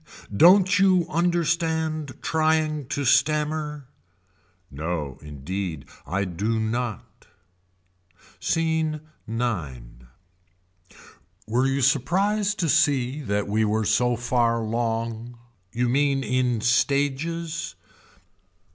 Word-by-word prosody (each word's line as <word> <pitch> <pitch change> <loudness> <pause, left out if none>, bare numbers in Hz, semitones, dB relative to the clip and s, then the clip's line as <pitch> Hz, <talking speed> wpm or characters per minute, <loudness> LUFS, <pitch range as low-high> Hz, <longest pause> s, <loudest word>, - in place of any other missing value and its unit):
Don't 190 - +6
you 185 -3 +4
understand 160 -3 0
trying 155 -3 +1
to 140 +1 -2
stammer. 150 +1 +1 0.8
No 75 -2 -4
indeed 80 +3 -5 0.2
I 100 +4 -1
do 105 +6 -2
not. 110 -1 -4 1.1
Scene 160 -2 0 0.3
IX. 105 - -3 1.6
Were 120 +4 +1
you 135 +1 0
surprised 195 - +1
to 170 - +1
see 145 -3 +2
that 100 -5 -1
we 110 +2 +1
were 110 0 0
so 120 +4 +2
far 120 -1 +1
long. 115 +1 -3 0.3
You 120 +1 0
mean 135 +1 +1
in 125 -3 0
stages. 145 +7 0
130 Hz, 90 wpm, -24 LUFS, 110-155 Hz, 1.6 s, Don't